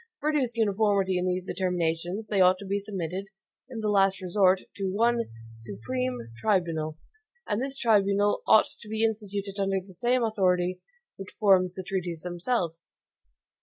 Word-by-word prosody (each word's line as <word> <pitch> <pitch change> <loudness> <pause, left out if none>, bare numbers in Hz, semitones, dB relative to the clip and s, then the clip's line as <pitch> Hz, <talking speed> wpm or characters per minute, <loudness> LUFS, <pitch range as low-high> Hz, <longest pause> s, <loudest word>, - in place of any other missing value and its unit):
To 460 -4 -35
produce 290 -5 0
uniformity 200 -3 +2
in 180 - -1
these 180 0 -1
determinations, 180 +1 -1
they 205 -2 +1
ought 185 0 +6
to 200 - -9
be 200 +1 -1
submitted, 195 -1 -5 0.4
in 235 -3 -6
the 215 - -1
last 195 -2 +3
resort, 185 0 +3 0.2
to 195 -2 -2
one 235 +3 +2 0.3
SUPREME 115 +3 -4
TRIBUNAL. 160 - 0 0.5
And 205 - -1
this 270 +1 -2
tribunal 205 -3 +2
ought 220 - +7 0.2
to 210 - -11
be 220 +1 -1
instituted 205 -2 -2
under 195 0 +1
the 190 +1 -14
same 240 +7 +1
authority 185 -4 +1 0.4
which 195 0 -10
forms 185 -3 +4
the 190 - -5
treaties 175 -4 -3
themselves. 175 -2 -2
195 Hz, 155 wpm, -27 LUFS, 180-215 Hz, 0.5 s, ought